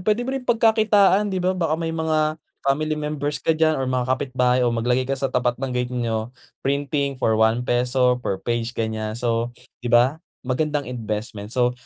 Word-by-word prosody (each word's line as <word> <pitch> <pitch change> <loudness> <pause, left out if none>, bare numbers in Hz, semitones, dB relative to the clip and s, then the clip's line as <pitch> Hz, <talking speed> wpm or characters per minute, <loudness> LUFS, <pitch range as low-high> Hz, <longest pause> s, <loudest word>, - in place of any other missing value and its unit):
puwede 215 +5 +1
mo 260 - -3
rin 270 -1 -3
pagkakitaan 220 -4 +4
di 190 - -2
ba? 185 0 +1
Baka 165 -4 0
may 165 0 -3
mga 155 -1 0 0.2
family 155 +3 +1
members 150 -1 -3
ka - - +2
diyan 155 0 +2
or 135 - -1
mga 125 -1 -1
kapitbahay 130 -1 +1
o 120 - +2
maglagay 120 +2 +1
ka 135 - 0
sa 135 0 -1
tapat 125 -1 +1
ng 135 -1 -2
gate 125 0 -2
nyo. 115 -1 -2 0.3
Printing 140 0 0
for 110 -3 +2
₱1 125 +3 +2
per 100 - -2
page 120 0 -2
ganyan. 110 -1 -2
So, 120 0 -1 0.3
di 120 - -4
ba, 120 +5 +4 0.3
magandang 145 +3 -1
investment? 110 -3 -5
So, 125 -1 +2
130 Hz, 180 wpm, -23 LUFS, 120-155 Hz, 0.3 s, pagkakitaan